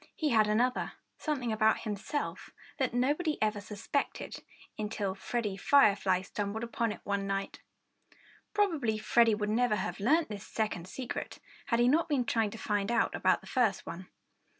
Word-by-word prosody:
He 310 - 0
had 220 -4 +4
another 240 +4 +1 0.3
something 265 -7 -1
about 220 0 +3
himself 215 +7 -4 0.3
that 260 -2 +1
nobody 295 +6 +1
ever 210 -1 0
suspected, 210 +7 -3 0.3
until 210 -2 -2
Freddie 205 0 -3
Firefly 200 -6 +4
stumbled 205 +3 -3
upon 230 -1 -1
it - - -8
one 200 -1 -1
night. 195 0 -3 0.9
Probably 320 - +1
Freddie 225 +1 +4
would 210 0 -2
never 235 -1 +2
have 210 +1 -3
learned 305 +11 +3
this 210 -1 -7
second 200 -6 -2
secret 250 +5 -5 0.3
had 235 -4 +2
he 240 - +5
not 325 +6 +3
been 270 -5 +1
trying 225 -2 +1
to 225 - -8
find 205 -1 -1
out 235 -1 +2
about - - +2
the - - -15
first 235 -7 +1
one. 185 +2 -7
220 Hz, 160 wpm, -31 LUFS, 205-250 Hz, 0.9 s, he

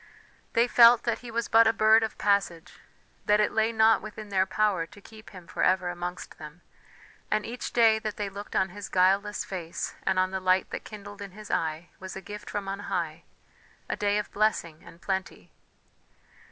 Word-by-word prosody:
They 235 +1 +3
felt 235 -1 +7
that 235 -2 -1
he 245 - -10
was 230 0 -2
but 225 0 +6
a 225 - +4
bird 220 +1 +5
of 220 -1 -3
passage, 195 -5 0 0.5
that 210 0 +4
it 210 - +2
lay 220 +1 +1
not 220 0 +4
within 215 0 -9
their 190 -1 +1
power 190 -4 0
to 205 - -16
keep 220 +1 -14
him 185 -3 -12
for - - -5
ever 185 -1 +2
amongst 175 0 -6
them, 155 +2 -11 0.7
and 215 0 0
each 240 +2 -5
day 225 -2 +4
that 215 -2 -5
they 205 -2 -2
looked 200 +1 -8
on 190 - +2
his 205 +2 -8
guileless 195 +3 +2
face 175 -3 -5
and 190 -1 0
on 185 0 +2
the 190 - -2
light 185 0 +1
that - - -6
kindled 205 -1 -10
in 200 -2 -8
his 210 +1 -9
eye, 160 +1 -2
was 190 0 -8
a - - -5
gift 210 +1 -9
from 205 -1 -4
on 195 +1 -4
high, 165 -2 -3 0.6
a - - -2
day 205 0 +1
of 210 - -3
blessing 200 -7 -1
and 170 - -15
plenty. 190 -1 -4
205 Hz, 200 wpm, -27 LUFS, 185-215 Hz, 0.7 s, felt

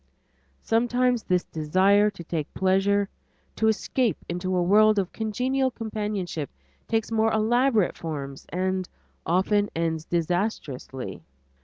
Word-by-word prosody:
Sometimes 245 +1 +2
this 180 -3 +1
desire 190 +7 +3
to 185 -4 -10
taste 160 -2 -3
pleasure, 195 +2 +2 0.5
to 220 - +1
escape 220 +1 +1
into 180 +2 -2
a 180 - +2
world 215 +3 +5
of 190 -2 0
congenial 255 +5 0
companionship 210 - -4 0.4
takes 225 0 -1
more 225 0 +2
elaborate 225 -1 +2
forms 140 -4 -6
and 185 0 -1 0.4
often 205 +4 +2
ends 160 -1 -1
disastrously. 160 - -2
200 Hz, 115 wpm, -26 LUFS, 175-220 Hz, 0.5 s, world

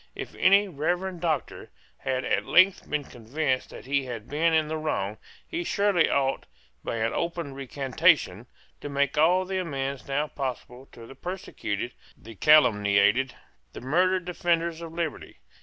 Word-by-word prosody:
If - - -7
any 200 +2 +4
Reverend 175 +2 -2
Doctor 155 -7 -2 0.3
had 130 -1 -2
at - - 0
length 185 +2 +4
been 150 -1 -1
convinced 130 +3 -2
that - - -11
he 140 0 0
had 120 -4 -7
been 160 +3 +1
in 160 -1 +2
the 160 - -3
wrong, 105 -9 -2 0.3
he 345 0 -3
surely 200 - +2
ought, 135 -1 0 0.4
by - - -3
an 115 0 -1
open 170 -4 -3
recantation, 135 - +1 0.3
to 145 - -7
make 140 0 0
all 175 +5 +4
the 190 0 -2
amends 140 -5 -4
now 140 +2 0
possible 130 -2 -6
to 115 - -11
the 125 - -11
persecuted, 130 - -5 0.2
the 115 - -12
calumniated, 110 -1 +4 0.4
the - - -8
murdered 180 +7 +1
defenders 170 -2 -1
of 165 -1 -7
liberty. 165 -2 -5
145 Hz, 155 wpm, -26 LUFS, 130-170 Hz, 0.4 s, any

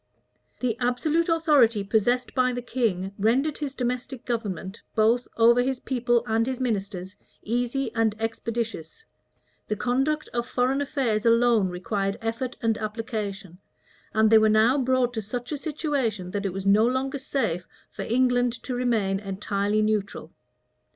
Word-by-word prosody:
The 245 -3 0
absolute 295 +8 +1
authority 290 -10 +4
possessed 240 +5 +1
by 255 -1 +2
the 245 - -3
king 200 -7 -1
rendered 260 +8 +1
his 285 -3 -4
domestic 250 0 -3
government, 210 -4 -4
both 230 +2 +3
over 235 +1 +6
his 260 0 -1
people 240 -2 +1
and 225 +1 +1
his 260 -1 -3
ministers, 200 -5 -3 0.3
easy 245 +2 -1
and 225 -2 +1
expeditious: 225 - -4 0.6
the 215 - -1
conduct 270 +7 0
of 240 0 -1
foreign 260 +3 +1
affairs 255 -7 0
alone 230 -4 +4
required 195 +2 -2
effort 230 +3 -3
and 225 -1 +1
application; 210 -4 -5 0.5
and 220 0 +3
they 220 - +8
were 215 0 +4
now 220 +4 +4
brought 255 -1 +1
to 220 - -2
such 245 +6 -5
a - - 0
situation, 270 - -2
that 200 0 -2
it - - -3
was 190 +1 -5
no 210 +3 +5
longer 265 +2 -1
safe 220 -11 -2 0.2
for - - -7
England 245 0 +2
to 255 - -4
remain 225 -6 0
entirely 200 +1 -1
neutral. 215 -2 -2
230 Hz, 150 wpm, -25 LUFS, 210-255 Hz, 0.6 s, they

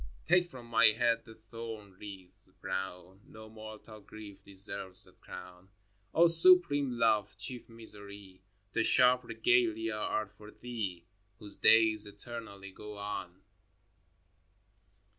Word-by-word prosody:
xx. - - -17
Take 175 +1 +2
from 130 -6 -13
my 115 +1 +3
head 115 -1 -1
the 110 -2 -15
thorn 110 -2 -11
wreath 95 -3 -14
brown! 95 0 -7
No 110 0 -14
mortal 110 0 -13
grief 100 -1 -14
deserves 95 -1 -8
that - - -20
crown. 90 +1 -13 0.5
O 170 - +5
supreme 165 -6 +7
Love, 105 -4 0
chief 125 -2 -9
Misery, 100 -4 -14 0.3
The 115 - 0
sharp 125 +2 +3
regalia 115 -1 -1
are 105 0 -3
for 105 +2 -17
Thee 105 -8 -8 0.3
Whose 105 0 -13
days 110 -2 +3
eternally 100 -2 -10
go 105 +2 -12
on 100 -2 -8
110 Hz, 120 wpm, -30 LUFS, 100-115 Hz, 0.5 s, supreme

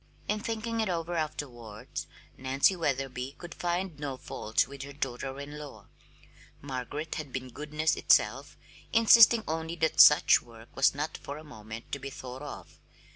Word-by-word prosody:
In 210 - 0
thinking 225 0 -2
it 215 - -1
over 170 -1 -2
afterwards 120 -9 -5 0.3
Nancy 135 +8 +2
Wetherby 135 -4 -2
could 175 -1 -9
find 175 -2 -2
no 140 -3 -4
fault 130 +3 -1
with 140 0 -9
her 140 +1 -7
daughter 135 -1 -4
in 145 +1 -7
law. 135 -9 -10 0.7
Margaret 140 +3 -5
had 145 -3 -12
been 130 0 -5
goodness 150 +4 -1
itself, - - +2 0.3
insisting 230 0 +7
only 160 +1 -3
that 160 -1 +4
such 150 - +7
work 115 -1 -16
was 135 0 +4
not 150 +2 -3
for 140 - -7
a 155 - -10
moment 110 -5 -10
to 140 - -3
be 135 +1 -6
thought 130 -1 -8
of. 145 - -9
145 Hz, 160 wpm, -29 LUFS, 130-165 Hz, 0.7 s, insisting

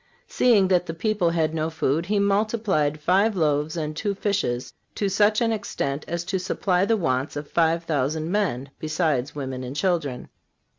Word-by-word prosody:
Seeing 215 -6 +4
that 180 -1 +2
the 165 - -4
people 205 -1 +1
had 160 -2 0
no 160 0 -1
food, 160 +1 -1
He 210 +1 +1
multiplied 200 -7 +1
five 195 +7 +2
loaves 150 -1 0
and 155 -1 -3
two 200 +4 -2
fishes 130 - -1 0.2
to 200 - 0
such 210 +3 +3
an 230 -1 +2
extent 150 -9 -3
as 170 0 -3
to 185 +2 -2
supply 185 0 0
the 225 +1 +2
wants 130 -6 -1
of 145 0 -5
five 165 +1 +1
thousand 155 +1 -1
men, 140 -10 -1
besides 155 -4 -1
women 130 -3 -4
and 130 +2 -6
children. 150 -6 -1
165 Hz, 170 wpm, -24 LUFS, 145-200 Hz, 0.2 s, Seeing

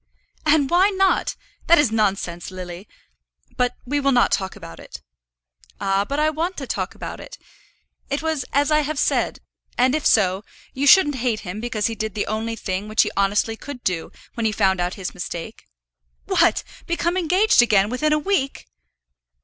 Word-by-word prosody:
"And 295 -2 +4
why 365 +3 +5
not? 385 -1 +1 0.3
That 340 - +7
is 295 -7 +3
nonsense, 195 -5 -1
Lily. 180 +1 -8 0.7
But 250 -1 0
we 290 +3 0
will 275 -1 +2
not 245 -2 +3
talk 190 -2 -1
about 85 - -11
it." - - -11 0.8
"Ah, 195 +1 +1
but 280 - -1
I 310 +1 +2
want 335 +4 -3
to - - -4
talk - - -3
about - - -7
it. - - -10 0.7
It 280 +2 -2
was 320 -4 -1
as 285 +2 +2
I 305 - +5
have 305 0 -2
said, - - 0 0.4
and 255 +2 +3
if 305 -1 -1
so, 190 -2 +3 0.3
you 280 +2 -1
shouldn't 295 -4 +6
hate 235 -3 -1
him 195 +2 -6
because 225 -3 -2
he 230 - 0
did 220 -2 -4
the 205 - -1
only 220 +1 -3
thing 195 -1 -4
which 215 0 +3
he - - -3
honestly 205 +3 +1
could 255 +1 -9
do 175 -3 -2 0.2
when 230 -2 -1
he - - 0
found 190 -3 +1
out 175 +1 -2
his 190 -3 -5
mistake." 175 -2 -7 0.6
"What; - - +2 0.2
become 340 +1 0
engaged 370 - +4
again 210 -4 +3
within 300 +5 0
a 305 - +4
week!" 300 -5 -1
240 Hz, 180 wpm, -22 LUFS, 200-300 Hz, 0.8 s, That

